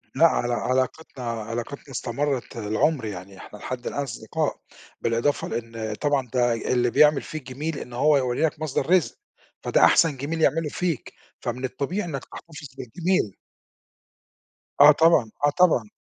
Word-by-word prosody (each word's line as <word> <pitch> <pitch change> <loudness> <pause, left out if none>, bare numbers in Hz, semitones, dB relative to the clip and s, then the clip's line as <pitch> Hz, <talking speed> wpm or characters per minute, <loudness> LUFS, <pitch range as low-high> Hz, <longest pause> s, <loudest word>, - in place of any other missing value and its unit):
لأ 165 - +6
على 120 -5 0
علاقتنا 130 +2 -2
علاقتنا 115 +4 -5
استمرّت 130 0 -2
العُمر 115 +5 0
يعني 95 -1 -7
إحنا 105 - -11
لحد 125 +3 -6
الآن 145 - -2
أصدقاء 135 - -3 0.4
بالإضافة 115 +5 0
لإن 115 -2 -4
طبعًا 145 -2 0
ده 120 -2 +3
ي 115 - -3
اللي 120 -1 +2
بيعمل 150 +1 +5
فيك 155 -3 -7
جِميل 150 +2 -3
إن 125 - -9
هو 145 +4 +4
يورّي 125 0 -1
لَك 150 - -3
مصدَر 145 0 -2
رزق، 185 -2 +3 0.5
فده - - +3
أحسن 155 -5 +4
جِميل 160 +5 -3
يعمله 160 -1 +2
فيك، 170 -4 -3 0.3
فمن 125 +2 -3
الطبيعي 175 +10 -3
إنَّك 135 -4 -5
تَحتفِظ 150 -3 -10
بالجِميل. 130 - -1 1.5
آه 150 +1 +10
طبعًا، 150 -8 +4
آه - - +5
طبعًا. 145 - +3
135 Hz, 150 wpm, -24 LUFS, 120-155 Hz, 1.5 s, آه